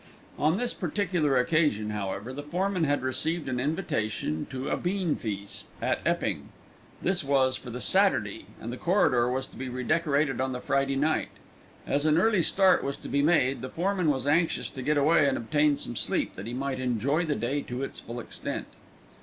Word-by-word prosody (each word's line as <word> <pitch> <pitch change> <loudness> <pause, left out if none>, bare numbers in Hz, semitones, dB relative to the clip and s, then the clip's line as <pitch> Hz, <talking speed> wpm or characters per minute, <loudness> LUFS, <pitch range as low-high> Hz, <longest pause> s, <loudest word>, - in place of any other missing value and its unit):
On 155 +5 +3
this 245 +2 -1
particular 175 -6 0
occasion, 125 -6 +2
however, 105 +3 -4
the 145 - -5
foreman 180 +3 0
had 145 -2 +1
received 155 +5 -1
an 130 -2 -1
invitation 110 - -2
to 130 0 -4
a - - +1
beanfeast 150 - -2
at - - 0
Epping. - - -1 0.5
This 180 -2 +1
was 135 -2 +2
for 130 -1 -8
the 120 +1 -5
Saturday, 100 - +2
and 120 +2 -5
the - - -5
corridor 125 -10 +3
was 130 +1 -1
to - - -15
be 130 0 -4
redecorated 140 +1 +1
on 130 0 -1
the 125 - -3
Friday 135 +1 0
night. 155 +3 +1 0.6
As 145 +2 +1
an 155 0 +4
early 210 0 +4
start 190 +3 +4
was 140 0 -3
to - - -9
be 140 - +2
made, 140 -5 +3
the 130 - -5
foreman 180 0 0
was 135 -3 0
anxious 160 +4 +1
to 130 - -7
get 150 +3 +1
away 145 +1 +4
and 135 - +1
obtain 145 +4 +2
some 120 - -6
sleep - - -1
that 100 +3 -7
he 120 - -5
might 135 0 -2
enjoy 130 +6 +1
the 155 -3 0
day 125 +6 -1
to 125 +1 -5
its - - -5
full 120 +1 -7
extent. - - -5
140 Hz, 190 wpm, -28 LUFS, 125-160 Hz, 0.6 s, an